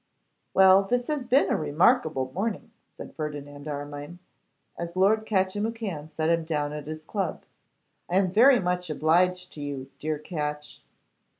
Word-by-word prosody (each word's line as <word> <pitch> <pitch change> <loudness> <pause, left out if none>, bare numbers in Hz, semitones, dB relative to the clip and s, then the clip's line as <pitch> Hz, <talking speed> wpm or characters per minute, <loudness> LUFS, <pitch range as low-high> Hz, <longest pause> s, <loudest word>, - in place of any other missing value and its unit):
'Well, 190 0 +7
this 245 +5 -1
has 295 -4 -2
been 255 +4 +3
a - - +3
remarkable 155 - +2
morning,' 220 +3 -3 0.3
said - - -9
Ferdinand 145 -1 -6
Armine, 145 +2 -6 0.6
as 170 +1 -6
Lord 215 +4 +3
Catchimwhocan 200 -4 -2
set 155 +1 0
him 165 -1 +1
down 150 -2 -2
at 150 -1 -7
his 155 0 -6
club. 195 +1 -3 0.6
'I 180 - +2
am 190 -2 +2
very 245 +6 +6
much 180 -2 -2
obliged 180 +4 +1
to 150 - -8
you, 140 -2 -6
dear 155 0 -2
Catch! 150 -2 -5
170 Hz, 145 wpm, -26 LUFS, 150-195 Hz, 0.6 s, Well